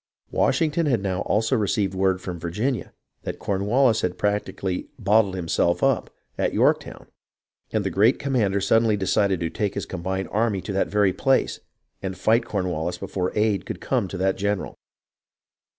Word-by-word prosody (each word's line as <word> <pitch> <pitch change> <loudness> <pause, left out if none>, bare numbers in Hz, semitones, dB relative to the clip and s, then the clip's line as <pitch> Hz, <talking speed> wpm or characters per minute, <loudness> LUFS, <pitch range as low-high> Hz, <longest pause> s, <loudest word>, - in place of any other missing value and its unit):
Washington 160 0 +1
had 125 -6 +2
now 95 -1 -1
also 110 +5 +1
received 100 -3 0
word 95 0 +1
from 90 -2 -5
Virginia 105 +7 -2 0.3
that - - -5
Cornwallis 110 +5 +2
had 90 0 -2
practically 100 -2 -2
" - - -41
bottled 105 -3 +3
himself 85 -1 0
up - - +2 0.2
" - - -44
at - - 0
Yorktown, - - +1 0.7
and - - 0
the - - -2
great 110 +7 +4
commander 110 -8 +1
suddenly 110 +2 +3
decided 100 -1 +1
to 85 -1 -1
take 100 -2 -2
his - - -3
combined 95 +1 -3
army 110 -2 +1
to 100 - -5
that 95 - +1
very 100 -2 +2
place 135 +6 +1 0.4
and 95 -1 -4
fight 115 +2 +2
Corn 100 -5 -2
wallis 85 +1 -2
before 95 -1 -3
aid 105 -3 +1
could - - -5
come 120 -7 0
to 95 - -6
that 95 +1 +1
general. 100 0 -2
100 Hz, 170 wpm, -24 LUFS, 95-110 Hz, 0.7 s, great